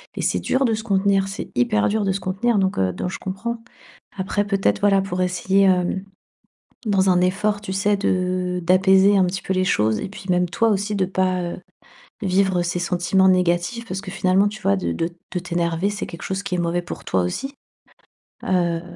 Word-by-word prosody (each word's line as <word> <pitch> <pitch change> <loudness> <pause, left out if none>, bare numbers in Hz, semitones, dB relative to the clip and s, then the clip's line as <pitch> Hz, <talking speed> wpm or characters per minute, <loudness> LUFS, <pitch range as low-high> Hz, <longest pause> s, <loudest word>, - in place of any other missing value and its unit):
et - - -3
c'est - - +1
dur 265 - 0
de 225 -3 +2
se 220 - -6
contenir, 195 -2 +2
c'est 195 - -6
hyper 105 -4 +2
dur 215 0 0
de 195 - +1
se 190 - -2
contenir 200 +5 0
donc 190 0 0
heu, 95 -1 +1
donc 180 - -3
je - - -5
comprends. 230 +5 -5 0.5
Après 200 +1 -1
peut-être 195 0 0
voilà 200 -1 +4
pour 185 -1 -3
essayer, 185 +2 +1
hem, 185 0 +2 0.8
dans 195 -2 +3
un 180 -1 +3
effort 205 +3 +1
tu 205 -2 -6
sais 200 +2 +1
de 185 -2 -1
d'apaiser 190 +3 +5
un 190 - +4
petit 185 +2 -3
peu - - -2
les 185 0 +1
choses, 110 - +1
et - - -4
puis 195 -1 -11
même 180 0 +2
toi 225 +7 +1
aussi 205 0 0
de 190 -2 +1
pas, 185 -1 0
heu, 175 0 -4 0.6
vivre 190 -1 +2
ces 175 +1 -2
sentiments 180 +2 +2
négatifs, 180 +6 0
parce 195 -2 -5
que 195 - -7
finalement 190 +1 +2
tu 215 +1 -9
vois? 100 - +2
De 85 -2 -2
de 165 - -1 0.2
de 180 - -1
t'énerver 170 0 -1
c'est 205 - -4
quelque 170 - -10
chose 190 +1 -3
qui 190 - -3
est - - -4
mauvais 175 +1 0
pour 175 - -8
toi 95 - +1
aussi. 270 - -4 0.9
Heu, 175 -3 +1
190 Hz, 210 wpm, -22 LUFS, 180-200 Hz, 0.9 s, d'apaiser